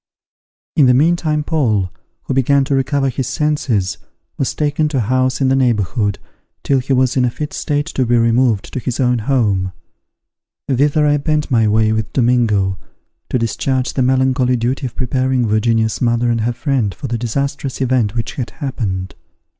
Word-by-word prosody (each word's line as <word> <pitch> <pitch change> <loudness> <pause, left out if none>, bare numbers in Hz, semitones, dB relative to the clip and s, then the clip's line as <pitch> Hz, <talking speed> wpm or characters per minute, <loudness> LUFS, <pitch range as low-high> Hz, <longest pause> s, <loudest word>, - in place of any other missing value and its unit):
In 145 -4 +5
the 125 - +5
meantime 155 +1 +2
Paul, 110 - 0 0.3
who - - -3
began 135 +2 +3
to 140 +1 -2
recover 135 +1 +1
his 130 0 -3
senses, 135 -10 -1 0.4
was 135 - -2
taken 150 0 0
to 150 -2 -2
a - - +2
house 130 +4 0
in 135 - +3
the 135 - +3
neighbourhood, 105 -4 +1 0.5
till 135 -1 +2
he 130 +2 -4
was 130 -1 +2
in 130 - +2
a 125 - +2
fit 150 +5 -6
state 145 -1 -1
to 140 -5 -1
be 120 +1 +3
removed 115 -2 +1
to - - -2
his 125 -1 -4
own 125 -2 +2
home. 105 -7 0 0.9
Thither 145 +3 +2
I 145 0 +3
bent 150 0 -1
my 115 -3 +3
way 110 +1 +2
with 110 -1 -2
Domingo, 110 -7 +1 0.5
to - - +1
discharge 125 +3 -1
the 130 - 0
melancholy 130 0 +2
duty 125 +3 -1
of 120 - -11
preparing 130 -1 0
Virginia's 110 0 +1
mother 120 0 +2
and 115 -1 0
her 120 +2 0
friend 120 - -1
for - - -8
the 115 0 -2
disastrous 140 +3 -3
event 125 -5 +1
which 115 -2 -3
had 125 -3 -3
happened. 100 - -4
125 Hz, 180 wpm, -17 LUFS, 115-135 Hz, 0.9 s, In